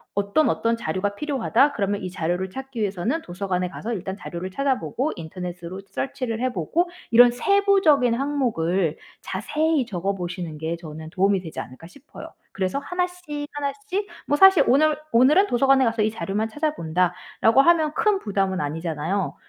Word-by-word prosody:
어떤 200 +10 +2
어떤 230 0 0
자료가 200 0 -2
필요하다. 275 0 +2
그러면 200 -1 -1
이 185 - -4
자료를 180 +1 -2
찾기 265 0 -7
위해서는 205 - -1
도서관에 180 0 -2
가서 230 +5 -5
일단 190 -1 -4
자료를 185 -1 -6
찾아보고 275 +3 -1
인터넷으로 180 +2 -7
Search를 245 -4 -3
해 255 -1 0
보고 315 - 0 0.2
이런 240 +1 +8
세부적인 380 - +3
항목을 195 - 0 0.2
자세히 300 +8 0
적어 195 0 -2
보시는 175 -3 -5
게 160 +2 -3
저는 160 -1 -9
'도움이 195 0 +2
되지 160 -7 -7
않을까?' 130 +7 -11
싶어요. 280 +9 -12 0.2
그래서 190 +4 -2
하나씩 355 -3 -4
하나씩 390 +8 -3 0.2
뭐 290 - +2
사실 385 -1 +7
'오늘 300 +4 +4 0.2
오늘은 290 - +5
도서관에 270 0 +4
가서 225 -2 +1
이 215 - +1
자료만 220 0 -2
찾아본다.' 180 - 0 0.3
라고 230 +5 +6
하면 315 -2 +3
큰 420 -3 +2
부담은 195 - -1
아니잖아요. 160 +5 -2
220 Hz, 395 characters per minute, -23 LUFS, 180-290 Hz, 0.3 s, 이런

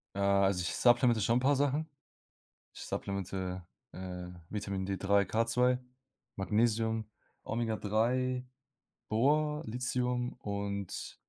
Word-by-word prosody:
Ja, 100 0 +3
also, 95 -2 +2
ich 90 - -2
supplemente 120 -2 +4
schon 115 +4 +3
'n - - +3
paar 140 +3 +3
Sachen. 145 +3 +1 0.9
Ich - - -9
supplemente, 95 -2 -3 0.3
äh, 90 -1 -6 0.2
Vitamin 100 -2 -3
D3, 100 +1 +2
K2, 125 +4 +2 0.6
Magnesium, 110 +2 +1 0.3
Omega 110 0 -1
3, 125 +4 +1 0.7
Bor, 150 +6 +2
Lithium 125 +1 -1
und 100 -2 -4
110 Hz, 105 wpm, -32 LUFS, 100-125 Hz, 0.9 s, supplemente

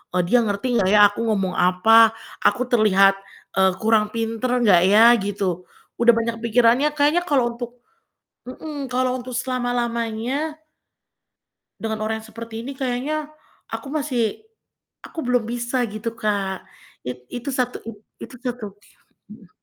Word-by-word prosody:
eee, 180 - +2
dia 245 +8 +3
ngerti 220 +3 -2
nggak 185 - +2
ya 210 +1 +5
aku 205 - -9
ngomong 195 -4 0
apa? 220 +5 +5 0.3
Aku 250 - +2
terlihat, 195 -4 +5 0.4
eee, 190 -1 +3
kurang 215 -1 +2
pinter 225 +2 -2
nggak 185 -6 +5
ya?" 225 +3 +7
Gitu. 190 -3 -3 0.3
Udah 235 0 +6
banyak 230 0 -2
pikirannya, 235 +4 +3
kayaknya 300 +4 +3
kalo 260 -6 +2
untuk 240 0 -7 0.7
mhm, 285 +1 -7
kalo 255 0 +1
untuk 250 +1 -8
selama-lamanya 245 +3 -2 1.2
dengan 220 -1 -3
orang 220 0 -2
yang 220 - -13
seperti 225 0 -8
ini 275 - -6
kayaknya 275 +4 -3 0.4
aku - - -6
masih 275 - -2 0.6
aku 325 - -7
belum 245 -2 0
bisa 240 +2 -2
gitu, 215 +2 -5
Kak. 200 -4 -3 0.4
It 125 0 -6
itu 245 +3 -5
satu 250 -1 -1
it 225 -2 -9 0.3
itu 260 - -14
tutup 235 -5 -5 0.6
mhm. 210 -4 -15
230 Hz, 140 wpm, -22 LUFS, 210-250 Hz, 1.2 s, ya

